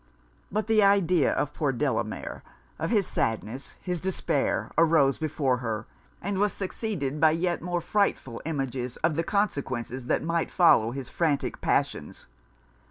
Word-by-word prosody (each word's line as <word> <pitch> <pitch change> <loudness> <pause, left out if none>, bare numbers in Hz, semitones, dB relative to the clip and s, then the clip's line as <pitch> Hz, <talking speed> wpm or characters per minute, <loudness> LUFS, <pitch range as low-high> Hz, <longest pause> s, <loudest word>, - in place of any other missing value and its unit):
But 215 +2 0
the 220 -1 +4
idea 185 -6 +4
of 145 - -1
poor 145 -3 0
Delamere 125 - -2 0.4
of 165 +1 -1
his 205 -4 +2
sadness, 115 - -3
his 180 -3 -2
despair, 190 0 -1
arose 155 -5 +4
before 145 -5 0
her, 110 -3 -3 0.4
and 195 0 -1
was 205 -1 +2
succeeded 185 - -3
by 160 - +7
yet 175 +2 0
more 175 0 -2
frightful 165 - 0
images 135 -5 -3
of 165 -1 +3
the 165 - +1
consequences 135 - -2
that - - +1
might 165 +1 0
follow 120 -11 +5
his 130 +1 -5
frantic 155 -5 -1
passions. - - -1
160 Hz, 145 wpm, -27 LUFS, 130-185 Hz, 0.4 s, by